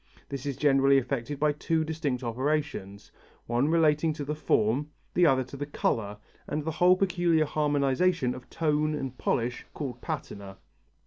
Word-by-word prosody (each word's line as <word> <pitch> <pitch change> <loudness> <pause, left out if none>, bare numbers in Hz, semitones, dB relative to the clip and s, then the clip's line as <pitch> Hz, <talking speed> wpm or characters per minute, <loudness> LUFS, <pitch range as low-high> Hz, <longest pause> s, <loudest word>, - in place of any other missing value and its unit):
This 140 0 -5
is 140 - -3
generally 140 -1 +4
effected 135 +1 -2
by 150 0 +3
two 160 +2 0
distinct 155 -5 -2
operations, 125 -5 -2 0.3
one 120 +4 +1
relating 160 -1 +3
to 150 -2 -5
the 150 - -2
form, 140 -1 +1 0.2
the 175 -1 +5
other 130 -2 +3
to 130 +2 -11
the 145 +1 -5
colour 105 -7 -1 0.3
and 150 - -2
the 160 - -1
whole 180 +4 +5
peculiar 175 -4 +2
harmonization 145 0 +1
of 125 - -11
tone 155 -1 0
and 135 -3 -4
polish 120 0 -1
called 125 -5 -5
patina. 100 - -6
145 Hz, 155 wpm, -28 LUFS, 125-155 Hz, 0.3 s, the